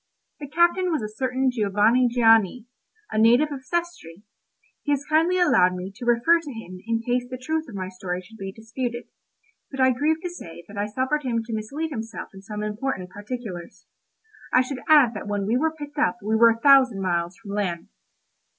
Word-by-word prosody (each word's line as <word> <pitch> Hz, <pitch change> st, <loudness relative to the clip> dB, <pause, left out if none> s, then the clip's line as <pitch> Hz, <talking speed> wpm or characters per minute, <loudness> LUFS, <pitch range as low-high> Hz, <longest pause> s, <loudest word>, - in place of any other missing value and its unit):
The 290 Hz, -, -7 dB
captain 345 Hz, +4 st, +2 dB
was 305 Hz, -8 st, -1 dB
a -, -, -2 dB
certain 255 Hz, +4 st, -1 dB
Giovanni 220 Hz, +2 st, +3 dB
Gianni, 225 Hz, -1 st, +4 dB, 0.5 s
a 215 Hz, -, 0 dB
native 240 Hz, +7 st, +4 dB
of 270 Hz, -2 st, -6 dB
Sestri; 260 Hz, -, -4 dB, 0.6 s
he 290 Hz, -, -2 dB
has 285 Hz, 0 st, -2 dB
kindly 325 Hz, +4 st, +2 dB
allowed 185 Hz, -, +4 dB
me 180 Hz, +2 st, -6 dB
to 240 Hz, +3 st, -8 dB
refer 240 Hz, +9 st, +4 dB
to 310 Hz, -4 st, -8 dB
him 185 Hz, -6 st, -9 dB
in 230 Hz, 0 st, -1 dB
case 245 Hz, +1 st, -1 dB
the 255 Hz, -, -5 dB
truth 315 Hz, +3 st, -3 dB
of 220 Hz, -, -9 dB
my 185 Hz, -1 st, -4 dB
story 185 Hz, -1 st, -5 dB
should 220 Hz, +5 st, -16 dB
be 195 Hz, 0 st, -5 dB
disputed; 235 Hz, +3 st, -5 dB, 0.7 s
but 270 Hz, -, -8 dB
I 260 Hz, 0 st, +5 dB
grieve 300 Hz, +6 st, +1 dB
to 355 Hz, -, -2 dB
say 170 Hz, -, -10 dB
that 205 Hz, -, -12 dB
I 205 Hz, +1 st, -1 dB
suffered 260 Hz, +7 st, -1 dB
him 235 Hz, -4 st, -1 dB
to 230 Hz, 0 st, -7 dB
mislead 275 Hz, +10 st, -4 dB
himself 225 Hz, -4 st, -6 dB
in 195 Hz, -, -11 dB
some 210 Hz, +1 st, -6 dB
important 210 Hz, -3 st, -3 dB
particulars. 205 Hz, -4 st, -7 dB, 0.7 s
I 255 Hz, -, +5 dB
should 255 Hz, 0 st, -4 dB
add 285 Hz, -7 st, +6 dB
that 205 Hz, -1 st, -7 dB
when 205 Hz, -1 st, -2 dB
we 220 Hz, +4 st, +1 dB
were 315 Hz, +5 st, +1 dB
picked 295 Hz, -1 st, -8 dB
up 300 Hz, -6 st, +2 dB
we 215 Hz, +2 st, 0 dB
were 230 Hz, +1 st, +7 dB
a 230 Hz, 0 st, 0 dB
thousand 260 Hz, -5 st, +5 dB
miles 175 Hz, 0 st, -1 dB
from 220 Hz, -3 st, -10 dB
land. 190 Hz, -5 st, -3 dB
235 Hz, 200 wpm, -24 LUFS, 205-275 Hz, 0.7 s, were